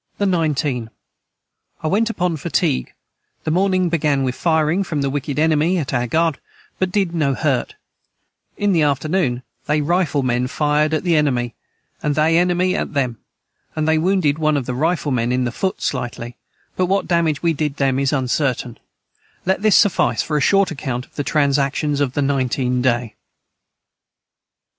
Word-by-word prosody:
the 200 Hz, -, 0 dB
19. 150 Hz, -, 0 dB, 0.9 s
I -, -, 0 dB
went 215 Hz, +7 st, +1 dB
upon 180 Hz, -6 st, -1 dB
fatigue 65 Hz, -, -1 dB, 0.5 s
the 155 Hz, -, -1 dB
morning 185 Hz, +1 st, +2 dB
began 150 Hz, -5 st, +1 dB
with 130 Hz, -1 st, -1 dB
fireing 160 Hz, +4 st, +1 dB
from 155 Hz, -6 st, -2 dB
the 135 Hz, -, 0 dB
wicked 145 Hz, 0 st, -3 dB
enemy 160 Hz, +3 st, +2 dB
at 145 Hz, -6 st, -3 dB
our 120 Hz, -1 st, 0 dB
guard 160 Hz, +2 st, +1 dB, 0.4 s
but 185 Hz, -1 st, 0 dB
did 190 Hz, -3 st, 0 dB
no 145 Hz, -5 st, +1 dB
hurt 135 Hz, -2 st, -1 dB, 0.8 s
in 205 Hz, 0 st, +1 dB
the 170 Hz, -4 st, +3 dB
afternoon 145 Hz, -2 st, 0 dB, 0.2 s
they 150 Hz, +1 st, +2 dB
rifle 150 Hz, -2 st, +1 dB
men 125 Hz, 0 st, 0 dB
fired 150 Hz, +2 st, +1 dB
at -, -, -2 dB
the 175 Hz, -3 st, +2 dB
enemy 125 Hz, -6 st, +1 dB, 0.5 s
and 150 Hz, -1 st, 0 dB
they 155 Hz, +2 st, +3 dB
enemy 180 Hz, +1 st, +1 dB
at -, -, -3 dB
them 125 Hz, -5 st, -1 dB, 0.6 s
and 155 Hz, -1 st, -1 dB
they 160 Hz, 0 st, +3 dB
wounded 165 Hz, -4 st, +1 dB
one 155 Hz, -1 st, +2 dB
of 135 Hz, -, -2 dB
the 125 Hz, -, -3 dB
rifle 155 Hz, +2 st, 0 dB
men 120 Hz, -1 st, 0 dB
in 125 Hz, 0 st, +1 dB
the 120 Hz, -, -1 dB
foot 190 Hz, +8 st, -2 dB
Slitely 120 Hz, 0 st, -3 dB, 0.4 s
but 185 Hz, -, +1 dB
what 195 Hz, +2 st, 0 dB
Damage 165 Hz, -4 st, +1 dB
we 165 Hz, -1 st, +3 dB
did 150 Hz, -1 st, -2 dB
them 135 Hz, -1 st, +1 dB
is 140 Hz, -1 st, +1 dB
uncertain 130 Hz, -3 st, -1 dB, 0.7 s
let 190 Hz, +1 st, +1 dB
this 215 Hz, -2 st, +5 dB
Suffice 205 Hz, -4 st, +2 dB
for 155 Hz, -, -3 dB
a 150 Hz, -, +2 dB
short 195 Hz, +3 st, +3 dB
acount 130 Hz, -4 st, -4 dB
of -, -, -31 dB
the 145 Hz, -, -3 dB
tranactions 145 Hz, 0 st, +1 dB
of 135 Hz, -3 st, 0 dB
the 145 Hz, -, 0 dB
19 130 Hz, -2 st, 0 dB
day. 120 Hz, -3 st, 0 dB
150 Hz, 170 wpm, -20 LUFS, 135-170 Hz, 0.9 s, this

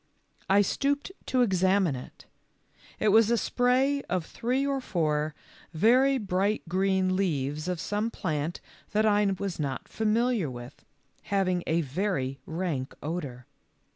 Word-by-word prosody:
I 200 Hz, +1 st, +5 dB
stooped 285 Hz, -, -1 dB, 0.2 s
to 255 Hz, -1 st, +3 dB
examine 190 Hz, -, +2 dB
it. 125 Hz, -, -10 dB, 0.7 s
It 215 Hz, -, +3 dB
was 220 Hz, +1 st, +5 dB
a 235 Hz, -, +3 dB
spray 260 Hz, +4 st, +2 dB
of 180 Hz, -3 st, -1 dB
three 250 Hz, +8 st, -1 dB
or 275 Hz, -1 st, -1 dB
four 155 Hz, -7 st, -1 dB, 0.4 s
very 255 Hz, +9 st, +4 dB
bright 200 Hz, -1 st, 0 dB
green 190 Hz, +1 st, +1 dB
leaves 155 Hz, -4 st, -1 dB
of 180 Hz, -2 st, -2 dB
some 210 Hz, +5 st, -1 dB
plant 155 Hz, -5 st, -3 dB, 0.3 s
that 215 Hz, +1 st, +3 dB
I 210 Hz, -1 st, +4 dB
was 195 Hz, -3 st, -4 dB
not 140 Hz, -3 st, -3 dB
familiar 220 Hz, -, +1 dB
with, 120 Hz, +2 st, -10 dB, 0.4 s
having 185 Hz, -3 st, 0 dB
a 165 Hz, +1 st, +2 dB
very 140 Hz, -3 st, -2 dB
rank 160 Hz, -6 st, -3 dB
odor. 145 Hz, -6 st, -5 dB
190 Hz, 135 wpm, -28 LUFS, 155-220 Hz, 0.7 s, I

